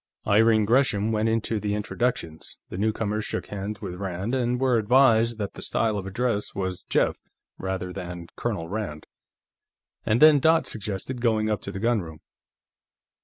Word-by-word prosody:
Irene 110 +1 +4
Gresham 110 -3 +2
went 110 0 +1
into 110 -1 0
the 105 0 -1
introductions, 105 -6 -3
the - - -6
newcomers 110 0 -1
shook - - -3
hands 100 0 -5
with 95 -4 -5
Rand 95 +4 -4
and 125 -1 0
were 130 -3 +3
advised 115 0 +4
that 100 -2 -4
the - - -9
style 110 -2 0
of 95 -2 -4
address 110 +1 -1
was 95 -2 -3
"Jeff," - - +1 0.4
rather 95 -1 -3
than 90 -2 -6
"Colonel 80 -1 -3
Rand," 95 -6 -5 1.0
and 110 - +2
then 155 0 +8
Dot 160 +3 +4
suggested 110 +4 -4
going 110 -2 +2
up 105 - -1
to 100 - -6
the 95 - -6
gunroom. 95 -9 -1
105 Hz, 160 wpm, -25 LUFS, 95-115 Hz, 1.0 s, then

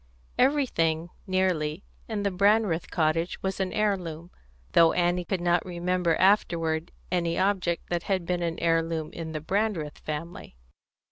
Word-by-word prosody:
Everything, 175 - +2 0.2
nearly, 185 -3 0 0.2
in 215 -3 -3
the 200 - +1
Brandreth 200 -2 +2
cottage 165 +1 0
was 190 0 -2
an 190 -1 -1
heirloom, 180 -6 -2 0.4
though 165 -1 +6
Annie 175 0 +1
could 185 0 -2
not 175 -1 +2
remember 180 -1 0
afterward 170 -4 +2 0.2
any 170 -2 0
object 185 -3 0
that 175 -1 0
had 185 -1 -1
been 180 0 -1
an 170 -1 -2
heirloom 165 -1 0
in 165 -1 -6
the 155 - -3
Brandreth 185 -4 -1
family. 155 - -6
175 Hz, 140 wpm, -27 LUFS, 165-190 Hz, 0.4 s, though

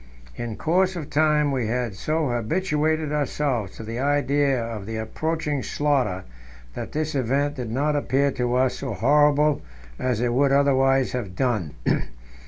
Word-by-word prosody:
In 115 -2 -5
course 185 - +1
of 160 -5 -6
time 150 -1 +3
we 125 -5 -1
had 120 -1 -1
so 155 +9 -1
habituated 155 - 0
ourselves 140 -8 -1
to - - -8
the 115 +2 -5
idea 140 -1 +2
of 115 -4 -5
the 110 - -4
approaching 150 +5 -2
slaughter 135 -13 0 0.5
that - - -6
this 155 +1 -1
event 140 +2 0
did 125 -3 -4
not 145 +6 0
appear 140 -1 +1
to 125 -1 -1
us 130 0 +1
so 130 -5 -3
horrible 145 +5 +3 0.4
as 125 -4 0
it 120 0 0
would 135 +2 +3
otherwise 135 -1 +3
have 105 -7 -4
done. 110 - -1
135 Hz, 155 wpm, -24 LUFS, 120-150 Hz, 0.5 s, time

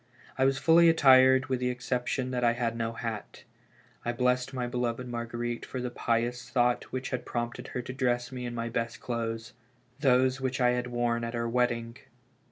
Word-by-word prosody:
I 130 - +2
was 135 0 +2
fully 165 +3 +6
attired 130 -4 +6
with 130 -2 -1
the 125 0 0
exception 125 +1 -2
that 125 -1 -1
had 120 -1 -1
no 115 0 -2
hat. 115 -2 -6 0.6
I 120 - -1
blessed 125 +1 +1
my 130 -2 -3
beloved 120 0 -2
Marguerite 120 0 -4
for 130 - -5
the 125 0 -3
pious 120 +1 -1
thought 120 -1 +2
which 130 0 -5
had 125 -2 -2
prompted 120 -1 -4
her 125 - -4
to 125 - -6
dress 125 -1 0
me 125 -1 -5
in 120 - -5
my 115 0 -2
best 115 0 -3
clothes 115 -1 -4 0.2
— - - -37
those 130 -1 +3
which 130 0 -2
I 125 -1 +4
had 125 0 -1
wprn 120 -1 -1
at 115 +1 -4
our 115 0 -1
wed: 125 +1 +2
ding. 115 0 -6
125 Hz, 195 wpm, -29 LUFS, 120-130 Hz, 0.6 s, fully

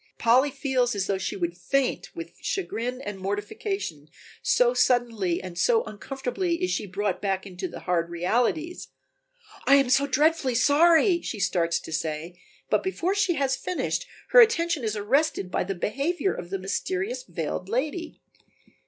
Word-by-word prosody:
Polly 255 +5 +4
feels 260 -4 0
as 195 -1 0
though 195 -1 -1
she 190 - -3
would 175 -2 -2
faint 265 +8 -1
with 335 0 -7
chagrin 250 - -3
and 205 -5 -6
mortification, 205 - -4 0.3
so - - +3
suddenly 230 - +2
and 180 -2 -7
so 460 -1 +3
uncomfortably 270 - -3
is 365 - +1
she 210 - -2
brought 195 -1 -2
back 195 -2 -1
to 185 -1 -5
the - - -9
hard 170 -1 0
realities. 245 - -1 0.8
"I 275 - +8
am 275 -3 +3
so 275 +2 +4
dreadfully 290 -2 +2
sorry," 335 - +5
she 215 - -5
starts 170 -3 +1
to - - -9
say, 165 +2 -4 0.3
but - - +2
before 380 -1 -1
she 380 -4 +1
has 270 -2 +1
finished, 365 - -2 0.2
her - - +7
attention 340 - +3
is 220 -1 -1
arrested 215 -1 +1
by - - 0
the 195 +1 -3
behavior 285 - -1
of 175 - -7
the 195 - -2
mysterious 375 - -2
veiled 190 - -4
lady. 305 - -2
250 Hz, 160 wpm, -26 LUFS, -, 0.8 s, I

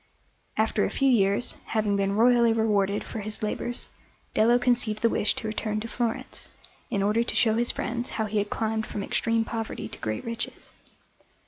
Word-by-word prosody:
After 220 -1 +2
a - - +1
few 275 -1 +2
years, 200 -1 +3
having 215 -2 0
been 200 0 0
royally 235 0 +5
rewarded 205 -3 +1
for 225 - -6
his 215 +1 -4
labours, 240 +3 -3 0.5
Dello 235 +3 +5
conceived 240 -3 +1
the 230 - +5
wish 210 - +2
to 220 - -4
return 215 0 -2
to 225 - -5
Florence, 235 -1 -3 0.4
in 200 - 0
order 210 +3 +2
to - - -3
show 220 -2 +4
his 235 +2 +2
friends 240 0 -2
how 220 - +1
he 210 0 0
had 205 0 -2
climbed 220 -1 -1
from 205 - -4
extreme 230 +2 +1
poverty 225 -1 -4
to - - -10
great 110 0 -3
riches. 230 0 -5
220 Hz, 185 wpm, -26 LUFS, 210-235 Hz, 0.5 s, royally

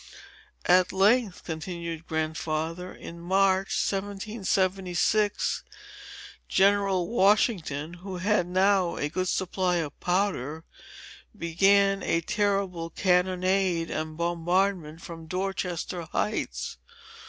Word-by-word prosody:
"At 180 +1 +4
length," 205 +1 +2
continued 170 0 -5
Grandfather, 160 +2 -2
"in 170 - -10
March, 190 +2 +2
1776, 195 0 0 0.9
General 195 -2 +3
Washington, 195 - +2
who 185 +1 -7
had 185 -1 +1
now 185 0 +2
a 145 - -2
good 185 +4 -2
supply 185 0 0
of 160 -4 -3
powder, 175 -5 -1 0.7
began 195 +4 +3
a 165 - +1
terrible 195 -3 -1
cannonade 185 -1 +1
and 155 0 -4
bombardment 170 -1 0
from 165 -1 -9
Dorchester 180 -1 -3
heights. - - -2
180 Hz, 90 wpm, -27 LUFS, 165-195 Hz, 0.9 s, At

